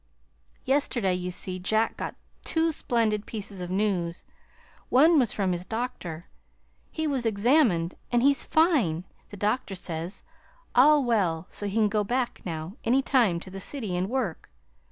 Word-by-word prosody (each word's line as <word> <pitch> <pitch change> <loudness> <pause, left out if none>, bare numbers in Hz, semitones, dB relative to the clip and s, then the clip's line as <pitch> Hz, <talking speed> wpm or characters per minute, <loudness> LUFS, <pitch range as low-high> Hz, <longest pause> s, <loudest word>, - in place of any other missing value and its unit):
Yesterday, 255 -8 +1
you 180 0 -3
see, 185 +1 -3
Jack 220 +5 +1
got - - -5 0.3
two 325 0 +1
splendid 220 -7 0
pieces 205 -3 -5
of 180 - -5
news. 185 -3 -1 0.7
One 310 +5 +6
was 245 -5 +2
from 195 -3 0
his 175 0 -2
doctor. 185 -7 -5 0.6
He 315 - -3
was 275 -5 0
examined, 215 - +3 0.2
and 240 0 +3
he's 280 0 +4
fine, 270 - +2 0.3
the 205 - -10
doctor 210 0 -1
says; 170 0 -4 0.5
all 290 +3 +6
well, 185 -9 +1
so 205 - -4
he 200 - -4
can 220 -2 +4
go 210 +1 0
back, 245 +4 -2
now 165 +4 -5
any 260 +4 +2
time, 230 -12 +2
to 185 - -10
the 195 - -7
city 215 -3 -3
and 180 +2 -1
work. 240 -10 -3
210 Hz, 155 wpm, -27 LUFS, 180-255 Hz, 0.7 s, One